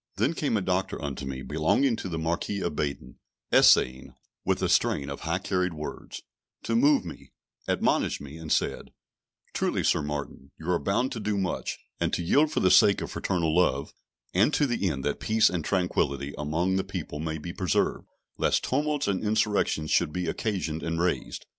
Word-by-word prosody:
Then 110 - +1
came 145 -8 0
a - - -1
Doctor 95 +1 -1
unto 70 -2 -5
me, 65 -1 -5
belonging 80 - +2
to 95 - -5
the 80 - -3
Marquis 85 +5 -2
of - - -2
Baden, 70 -4 -4 0.3
essaying, 65 +1 +4 0.3
with - - +1
a - - +3
strain 70 -1 +1
of 70 - -6
high 85 +2 -1
carried 90 -2 -1
words, 75 0 -7 0.4
to 115 - -1
move 140 -3 +4
me, 85 - -10 0.3
admonished - - +1
me, 70 +1 -9
and 80 -2 -7
said: - - -1 0.6
"Truly, - - 0
Sir - - +2
Martin, 75 -2 -5
you 80 - -9
are 85 - +2
bound 125 +7 0
to 115 - -4
do 105 -1 -1
much, 95 -2 -2 0.2
and - - 0
to - - 0
yield 145 - +3
for - - 0
the 95 - +4
sake 95 +2 +6
of - - -5
fraternal 85 -4 -1
love, 70 -6 +1 0.4
and - - +4
to 145 - +3
the 115 -7 0
end 70 -4 -4
that - - -1
peace 110 0 +3
and 85 -3 -2
tranquillity 70 -7 0
among 85 +6 0
the 95 - 0
people 90 -6 -6
may 80 0 -3
be 85 +3 -7
preserved, 90 -4 0 0.3
lest - - +2
tumults 145 +2 0
and 100 0 0
insurrections 105 -7 +1
should 85 -3 +3
be 90 +2 -3
occasioned 85 -4 -2
and 80 0 -2
raised. 90 +1 -1
90 Hz, 190 wpm, -27 LUFS, 75-100 Hz, 0.6 s, sake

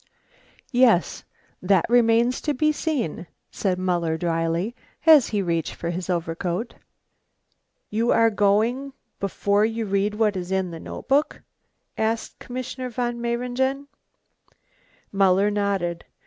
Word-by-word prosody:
"Yes, 240 - +3 0.4
that 185 -1 +3
remains 235 +1 +3
to 295 -2 -1
be 305 +4 +2
seen," 265 - -3 0.2
said 185 -3 -1
Muller 175 -3 0
dryly, 165 +5 -1 0.3
as 310 -5 +7
he 205 -2 -1
reached 165 -3 -2
for 170 - -4
his 180 +2 -5
overcoat. 175 +5 -2 1.2
"You 230 +3 0
are 230 0 +4
going 220 +7 +1 0.3
before 200 +1 +1
you 225 +1 -1
read 200 +1 0
what 210 -2 +1
is 180 0 -5
in 190 -2 0
the 165 - -7
notebook?" 280 - -1 0.6
asked 220 +1 -2
Commissioner 255 +1 -5
von 240 0 -3
Mayringen. 250 +4 -1 1.2
Muller 195 +1 +3
nodded. 195 -5 -1
210 Hz, 120 wpm, -24 LUFS, 180-245 Hz, 1.2 s, as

